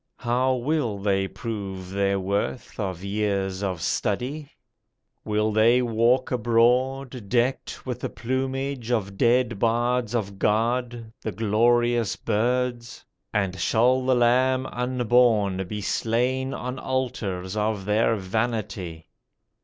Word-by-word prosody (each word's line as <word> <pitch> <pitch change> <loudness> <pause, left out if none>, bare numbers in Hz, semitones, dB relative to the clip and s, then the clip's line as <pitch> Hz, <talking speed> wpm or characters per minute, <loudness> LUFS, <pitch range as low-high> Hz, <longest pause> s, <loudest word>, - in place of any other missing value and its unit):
How 125 +2 +1
will 125 -4 -1
they 95 -1 0
prove 95 -5 -6
their 100 0 +1
worth 100 +7 -3
Of 95 -3 -3
years 100 -2 -1
of 95 -4 -2
study? 135 - -2 0.7
Will 105 0 0
they 115 +4 +4
walk 120 +2 +2
abroad 125 0 +1
Decked 125 +2 -1
with 125 -2 -4
the - - -3
plumage 130 0 -3
of 100 -5 -1
dead 120 0 +2
bards 120 +1 +1
of 100 -4 -3
God, 115 +1 0
The 110 - -3
glorious 115 +3 +2
birds? 120 +2 -1 0.3
And 95 -3 -1
shall 125 +8 +3
the 130 0 +3
lamb 130 +2 +3
unborn 120 -6 +2
Be 105 +2 -4
slain 125 +6 0
on 125 +1 -5
altars 110 -8 -3
of 105 -2 -1
their 110 +2 +2
vanity? 100 -5 -3
115 Hz, 115 wpm, -25 LUFS, 100-125 Hz, 0.7 s, they